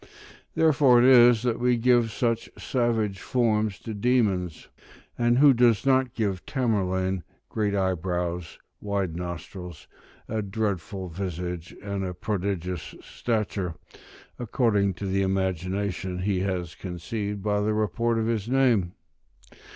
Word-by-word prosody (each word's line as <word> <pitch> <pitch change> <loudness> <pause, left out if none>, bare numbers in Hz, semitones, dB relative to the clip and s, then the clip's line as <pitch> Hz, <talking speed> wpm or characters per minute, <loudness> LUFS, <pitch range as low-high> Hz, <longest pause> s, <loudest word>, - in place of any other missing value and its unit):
Therefore 145 -6 +5
it 120 - +5
is 120 -3 +7
that 120 -2 0
we 125 0 +2
give 120 -1 +3
such 115 +1 -1
savage 115 -6 0
forms 110 -3 0
to 110 - -6
demons: 100 -6 0 0.5
and 120 0 +2
who 140 0 +7
does 120 -1 +3
not 130 -2 +2
give 100 -5 -1
Tamerlane 95 - 0 0.3
great 105 -2 -1
eyebrows, 90 -2 -2 0.2
wide 100 -5 -2
nostrils, 90 -1 -7 0.4
a 110 0 -2
dreadful 100 -2 -3
visage, 90 -1 -5
and 100 -1 -3
a 90 -1 -4
prodigious 90 -4 -3
stature, 105 -7 -2 0.6
according 105 -5 +1
to 100 - -6
the 95 0 0
imagination 95 0 -1
he 100 -2 +1
has 90 -3 -2
conceived 100 +3 -5
by 105 -1 +1
the 105 +1 0
report 115 +2 0
of 110 - 0
his 115 -1 -1
name? 120 -9 +2
100 Hz, 125 wpm, -26 LUFS, 90-115 Hz, 0.6 s, is